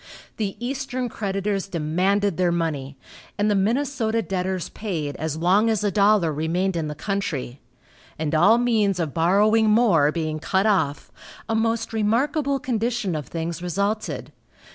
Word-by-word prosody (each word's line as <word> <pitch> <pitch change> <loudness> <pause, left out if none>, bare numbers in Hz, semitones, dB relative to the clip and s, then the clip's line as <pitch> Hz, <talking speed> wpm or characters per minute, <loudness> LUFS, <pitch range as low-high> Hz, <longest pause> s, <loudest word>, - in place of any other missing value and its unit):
The 205 -3 -2
eastern 255 0 -3
creditors 195 -2 -2
demanded 185 +4 0
their 180 -1 +2
money, 145 -5 -2 0.4
and 210 +1 +2
the - - +2
Minnesota 230 +1 0
debtors 185 -2 -2
paid 160 -9 -4
as 160 -1 -3
long 190 +7 +3
as 220 -2 0
a 205 - +1
dollar 200 -4 +3
remained 175 +5 -1
in 160 -2 -1
the 150 - -5
country, 155 -9 -3 0.6
and 155 0 -2
all 200 +9 +5
means 220 -6 +1
of 155 -5 -2
borrowing 210 +6 +3
more 200 -10 +4
being 155 -1 -3
cut 190 +5 0
off, 185 -9 0 0.4
a - - -1
most 225 0 0
remarkable 275 +7 +1
condition 235 -6 -1
of 150 -5 -4
things 165 0 -4
resulted. 200 +5 -2
195 Hz, 145 wpm, -23 LUFS, 165-220 Hz, 0.6 s, all